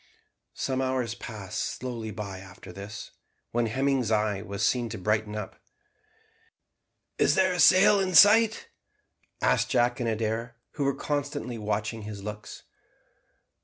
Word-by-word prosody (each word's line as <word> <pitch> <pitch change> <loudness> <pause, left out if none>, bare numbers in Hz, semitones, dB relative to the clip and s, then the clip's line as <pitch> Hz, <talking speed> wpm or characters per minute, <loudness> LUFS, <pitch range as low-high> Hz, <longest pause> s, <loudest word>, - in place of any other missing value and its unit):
Some 130 0 -2
hours 130 -3 -1
passed 105 -6 -7 0.2
slowly 120 -3 -5
by 100 -3 -6
after 95 -1 -12
this, 100 +3 -8 0.4
when 120 0 +1
Hemming's 130 0 0
eye 105 -2 +1
was 100 0 -2
seen 120 -2 +1
to 110 - -6
brighten 105 +2 -1
up. 105 -2 -7 1.6
"Is 145 - +4
there 185 -1 +3
a 180 - -3
sail 200 +3 +6
in 185 -2 -1
sight?" 220 +4 +6 0.7
asked - - +2
Jack 120 +2 +2
and 120 -2 -1
Adair, 115 +1 -2 0.2
who 145 - -2
were 140 - +1
constantly 140 -5 -3
watching 105 +1 -2
his 105 -2 -8
looks. 105 0 -8
115 Hz, 135 wpm, -27 LUFS, 105-135 Hz, 1.6 s, sail